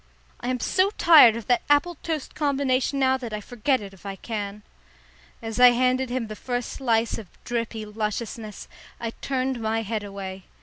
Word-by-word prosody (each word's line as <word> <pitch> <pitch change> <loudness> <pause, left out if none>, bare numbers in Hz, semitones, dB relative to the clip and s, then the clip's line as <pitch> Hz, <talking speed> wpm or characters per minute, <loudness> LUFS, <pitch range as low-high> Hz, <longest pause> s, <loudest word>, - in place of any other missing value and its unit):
"I 245 - -6
am 255 -1 -1
so 375 +10 +2
tired 300 -10 +8
of 230 -2 -6
that 245 - +2
apple 290 +5 +4
toast 315 -4 -4
combination 275 -2 0
now 265 -1 +3
that 240 -4 -7
I 210 - -2
forget 245 +4 0
it 200 -1 -9
if 190 - -18
I 195 -1 -5
can." 210 -1 -5 0.8
As 225 0 -4
I 250 0 +10
handed 255 +1 +1
him 250 -1 -2
the 215 -1 -7
first 245 +1 -3
slice 230 -3 0
of 215 - -10 0.2
drippy 230 -2 -3
lusciousness, 215 0 -4 0.3
I 230 -1 -3
turned 260 0 -2
my 225 +1 0
head 215 0 -3
away. 195 -2 -7
235 Hz, 180 wpm, -25 LUFS, 215-260 Hz, 0.8 s, I